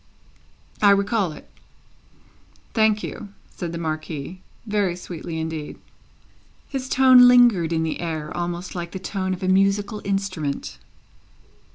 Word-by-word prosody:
"I 205 Hz, -, +6 dB
recall 200 Hz, -2 st, +2 dB
it." 150 Hz, -, -12 dB, 1.3 s
"Thank 220 Hz, -2 st, +2 dB
you," 205 Hz, -, -7 dB, 0.2 s
said 175 Hz, -3 st, -5 dB
the 170 Hz, -, -5 dB
Marquis 155 Hz, +1 st, -5 dB, 0.2 s
very 205 Hz, -5 st, 0 dB
sweetly 170 Hz, -2 st, -6 dB
indeed. 160 Hz, -2 st, -5 dB, 0.9 s
His 265 Hz, -2 st, -5 dB
tone 255 Hz, -2 st, +7 dB
lingered 240 Hz, -10 st, +5 dB
in 160 Hz, -1 st, 0 dB
the 160 Hz, -, -3 dB
air, 160 Hz, -2 st, -4 dB
almost 175 Hz, +1 st, -4 dB
like 170 Hz, -1 st, -6 dB
the -, -, -4 dB
tone 190 Hz, 0 st, -3 dB
of 185 Hz, 0 st, -4 dB
a -, -, 0 dB
musical 195 Hz, +3 st, +2 dB
instrument. 195 Hz, -8 st, -3 dB
185 Hz, 130 wpm, -23 LUFS, 165-205 Hz, 1.3 s, tone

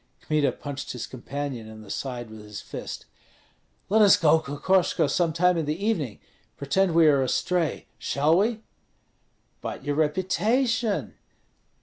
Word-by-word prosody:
Kmita 150 Hz, -2 st, +1 dB
punched 140 Hz, -1 st, -6 dB
his 125 Hz, -, -5 dB
companion 130 Hz, -2 st, -5 dB
in 110 Hz, 0 st, -11 dB
the 100 Hz, -, -10 dB
side 120 Hz, -4 st, -5 dB
with 110 Hz, -, -10 dB
his 105 Hz, -1 st, -8 dB
fist. -, -, -7 dB, 0.8 s
"Let 215 Hz, +3 st, +4 dB
us 205 Hz, -2 st, +7 dB
go, 160 Hz, 0 st, +4 dB
Kokoshko, 165 Hz, +3 st, +1 dB
some 165 Hz, +3 st, +1 dB
time 180 Hz, +2 st, +3 dB
in 160 Hz, -, -1 dB
the 155 Hz, +3 st, -2 dB
evening, 155 Hz, -, -1 dB, 0.4 s
pretend 170 Hz, +5 st, +1 dB
we 165 Hz, -1 st, +6 dB
are 145 Hz, -3 st, +5 dB
astray, 165 Hz, +5 st, 0 dB
shall 150 Hz, +4 st, +2 dB
we?" 220 Hz, +2 st, 0 dB, 1.0 s
"But -, -, -6 dB
your 145 Hz, -, -1 dB
reputation?" 210 Hz, -, 0 dB
155 Hz, 140 wpm, -26 LUFS, 140-185 Hz, 1.0 s, us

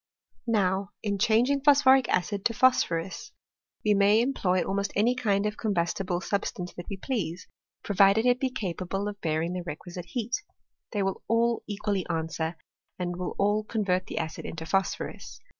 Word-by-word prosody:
Now, 195 Hz, -3 st, +1 dB
in 200 Hz, -2 st, -1 dB
changing 235 Hz, +6 st, +3 dB
phosphoric 270 Hz, -3 st, +5 dB
acid 190 Hz, +3 st, +1 dB
into 230 Hz, +4 st, 0 dB
phosphorus, 175 Hz, -8 st, +1 dB, 0.5 s
we 210 Hz, -, +5 dB
may 200 Hz, +2 st, +5 dB
employ 195 Hz, -8 st, +1 dB
almost 200 Hz, +1 st, -1 dB
any 225 Hz, +5 st, +3 dB
kind 210 Hz, -5 st, +1 dB
of 210 Hz, 0 st, -2 dB
combustible 180 Hz, -2 st, -1 dB
sub? 200 Hz, +1 st, 0 dB
stanqe 180 Hz, -3 st, -5 dB
that 175 Hz, -, -9 dB
we 195 Hz, -, -4 dB
please, 185 Hz, -8 st, -3 dB, 0.4 s
provided 200 Hz, +2 st, +4 dB
it 250 Hz, 0 st, +4 dB
be 265 Hz, -, 0 dB
capable 195 Hz, -4 st, -3 dB
of 205 Hz, -1 st, -6 dB
bear 160 Hz, -1 st, 0 dB
ing 170 Hz, +2 st, -2 dB
tl>e 180 Hz, -1 st, -4 dB
requisite 175 Hz, +2 st, -7 dB
heat; 235 Hz, +7 st, -2 dB, 0.5 s
they 205 Hz, -3 st, 0 dB
will 195 Hz, 0 st, -2 dB
all 230 Hz, +1 st, +2 dB
equally 205 Hz, -2 st, -1 dB
answer, 160 Hz, 0 st, -2 dB, 0.4 s
and 175 Hz, -1 st, -3 dB
will 180 Hz, -, -4 dB
all 205 Hz, +2 st, +2 dB
convert 195 Hz, -4 st, -1 dB
the -, -, -6 dB
acid 160 Hz, -1 st, -3 dB
into 160 Hz, 0 st, -6 dB
phosphorus. 195 Hz, +3 st, -2 dB
200 Hz, 165 wpm, -28 LUFS, 180-220 Hz, 0.5 s, phosphoric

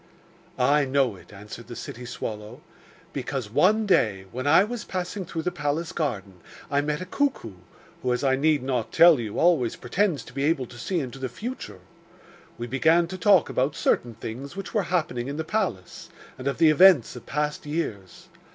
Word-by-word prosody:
'I 140 Hz, +3 st, +3 dB
know 130 Hz, -4 st, +1 dB
it,' -, -, -17 dB
answered 105 Hz, +3 st, -10 dB
the 120 Hz, -, -8 dB
city 125 Hz, +2 st, -8 dB
swallow, 110 Hz, +1 st, -6 dB, 0.5 s
'because, 130 Hz, -4 st, -4 dB
one 215 Hz, -, +3 dB
day, 105 Hz, -, +2 dB
when 130 Hz, +5 st, -4 dB
I 175 Hz, -, +6 dB
was 230 Hz, +1 st, -5 dB
passing 185 Hz, +1 st, -4 dB
through 165 Hz, -1 st, -4 dB
the 180 Hz, -, -1 dB
palace 155 Hz, 0 st, -2 dB
garden, 100 Hz, -, -3 dB, 0.3 s
I 140 Hz, 0 st, +2 dB
met 150 Hz, +3 st, -2 dB
a -, -, -4 dB
cuckoo, 220 Hz, -, -1 dB, 0.5 s
who, 125 Hz, -, 0 dB
as 125 Hz, -, -1 dB
I 135 Hz, -1 st, +3 dB
need 150 Hz, 0 st, +2 dB
not 125 Hz, -4 st, -2 dB
tell 170 Hz, -4 st, +7 dB
you, 110 Hz, -3 st, -5 dB
always 160 Hz, -9 st, +3 dB
pretends 160 Hz, -, -1 dB
to -, -, -14 dB
be 135 Hz, +1 st, -2 dB
able 150 Hz, -4 st, +1 dB
to 120 Hz, 0 st, -13 dB
see 175 Hz, +9 st, -1 dB
into 135 Hz, -2 st, -6 dB
the 130 Hz, -1 st, -3 dB
future. 125 Hz, -, -7 dB, 0.8 s
We 120 Hz, -, -4 dB
began 160 Hz, +7 st, +3 dB
to 185 Hz, -, -6 dB
talk 195 Hz, -5 st, +5 dB
about 135 Hz, +3 st, 0 dB
certain 120 Hz, -2 st, 0 dB
things 125 Hz, -, -7 dB
which 195 Hz, 0 st, -7 dB
were 215 Hz, -, +2 dB
happening 155 Hz, -9 st, -1 dB
in 140 Hz, +1 st, -4 dB
the 160 Hz, -, -2 dB
palace, 160 Hz, -, -3 dB, 0.3 s
and 130 Hz, -, -6 dB
of 140 Hz, -, -1 dB
the 160 Hz, -2 st, +6 dB
events 165 Hz, -, +6 dB
of 125 Hz, -, -11 dB
past 150 Hz, +1 st, -2 dB
years. 110 Hz, -, -5 dB
140 Hz, 190 wpm, -25 LUFS, 120-170 Hz, 0.8 s, tell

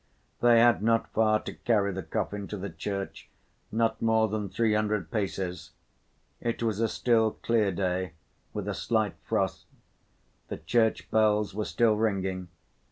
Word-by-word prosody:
They 120 Hz, -1 st, +6 dB
had 120 Hz, -2 st, +5 dB
not 115 Hz, +1 st, +1 dB
far 110 Hz, -1 st, +3 dB
to -, -, -6 dB
carry 105 Hz, -4 st, +1 dB
the 95 Hz, -, -4 dB
coffin 100 Hz, +4 st, -3 dB
to 105 Hz, -, -5 dB
the 100 Hz, +1 st, -5 dB
church, 100 Hz, -1 st, -5 dB, 0.4 s
not 110 Hz, 0 st, 0 dB
more 110 Hz, -1 st, +3 dB
than 105 Hz, -1 st, -3 dB
three 110 Hz, +3 st, +1 dB
hundred 105 Hz, -5 st, 0 dB
paces. 90 Hz, -5 st, -3 dB, 0.7 s
It 115 Hz, 0 st, -2 dB
was 110 Hz, -2 st, 0 dB
a 115 Hz, -, +2 dB
still, 110 Hz, 0 st, +2 dB
clear 110 Hz, -4 st, +1 dB
day, 90 Hz, -1 st, -1 dB, 0.4 s
with -, -, -5 dB
a -, -, -1 dB
slight 110 Hz, -3 st, 0 dB
frost. -, -, -1 dB, 0.8 s
The -, -, -5 dB
church 115 Hz, -2 st, +1 dB
bells 105 Hz, -2 st, +3 dB
were 105 Hz, +1 st, -2 dB
still 115 Hz, -3 st, +2 dB
ringing. 95 Hz, -4 st, -1 dB
105 Hz, 155 wpm, -28 LUFS, 100-115 Hz, 0.8 s, They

